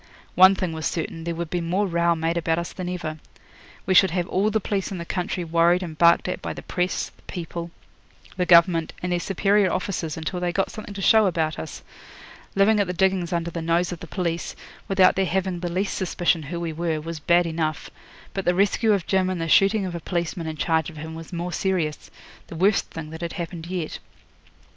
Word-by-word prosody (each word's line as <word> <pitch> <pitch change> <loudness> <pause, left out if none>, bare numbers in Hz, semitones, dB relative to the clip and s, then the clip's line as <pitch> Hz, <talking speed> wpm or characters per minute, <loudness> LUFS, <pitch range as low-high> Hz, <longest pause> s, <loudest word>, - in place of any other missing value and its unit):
One 185 +2 +7
thing 185 -3 -2
was 160 0 -2
certain: 165 -1 -4
there 170 -1 -2
would 170 -1 -5
be 175 - -1
more 180 +5 0
row 170 -2 +2
made 165 +1 -1
about 165 -1 0
us 170 0 -4
than 180 -1 -5
ever. 160 -4 -4 0.7
We 190 - +2
should 190 +1 +7
have 175 +1 -1
all 200 +3 +1
the 220 +1 +1
police 200 -1 -2
in 190 - -4
the 170 - -5
country 180 +1 -2
worried 170 +2 +3
and 165 -3 -6
barked 170 +3 +4
at 180 - -3
by - - -4
the - - -9
press, 180 0 -2
the - - -25
people, 170 -1 -5 0.7
the 180 -1 -1
Government, 170 -1 +5
and 180 - -1
their 175 - +1
superior 195 +1 +2
officers 180 -5 -2
till 180 +2 -2
they 175 0 -1
got 195 +2 -1
something 210 -2 -8
to 195 - -4
show 220 0 +6
about 160 -3 -1
us. 160 - -7 0.7
Living 205 +2 +4
at 200 - +2
the 180 - -2
diggings 185 -1 +1
under 170 -1 -1
the 170 - -4
nose 170 +2 +1
of 175 - -6
the 170 - -9
police, 170 -1 -3 0.3
without 190 -1 +4
their 190 - +2
having 190 -1 -1
the 175 0 -3
least 190 +4 -1
suspicion 175 -2 0
who 165 +4 -5
we 170 -2 -3
were, 165 -1 -1
was 165 +1 -6
bad 175 +3 +3
enough; 160 -2 -2 0.4
but 195 - -2
the 175 - +2
rescue 205 +3 +3
of 195 -4 0
Jim 190 -1 +1
and 185 -2 -2
the 165 - -2
shooting 195 +4 +4
of 180 - -4
a 170 - -4
policeman 170 0 -3
in 155 -1 -5
charge 160 0 +1
of 160 - -12
him 160 +2 -7
was 165 -1 -9
more 175 0 -4
serious 175 -6 -1 0.4
the - - -9
worst 195 +4 +2
thing 155 -1 -7
that 160 +1 -8
had 170 -1 -4
happened 170 -2 -6
yet. 175 -3 -4
175 Hz, 225 wpm, -24 LUFS, 165-185 Hz, 0.7 s, One